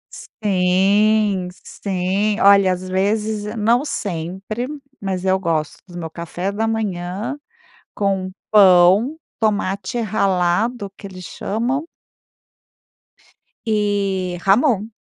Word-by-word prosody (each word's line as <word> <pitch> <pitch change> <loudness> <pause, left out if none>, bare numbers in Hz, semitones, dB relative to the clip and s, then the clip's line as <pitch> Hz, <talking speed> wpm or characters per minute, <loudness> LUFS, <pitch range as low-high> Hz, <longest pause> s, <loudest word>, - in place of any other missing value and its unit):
Sim, 200 0 +2 0.2
sim, 195 +2 -1
olha, 200 -2 +6
às 185 +1 -4
vezes, 210 +3 0
n 210 +2 -5
não 230 +4 +2
sempre, 195 - -4 0.3
mas 190 -2 -3
eu 190 0 +2
gosto 160 -4 -1
do 175 -1 -10
meu 165 - -4
café 170 +3 -4
da 220 +2 -1
manhã, 210 +2 -3 0.6
com 195 -2 -1 0.2
pão, 195 - +6 0.2
tomate 205 0 -1
ralado 200 +1 0
que 200 - -9
eles 185 -2 -10
chamam 250 - -2 1.8
e 200 -4 0
jamón. 215 +1 +3
200 Hz, 100 wpm, -20 LUFS, 185-215 Hz, 1.8 s, olha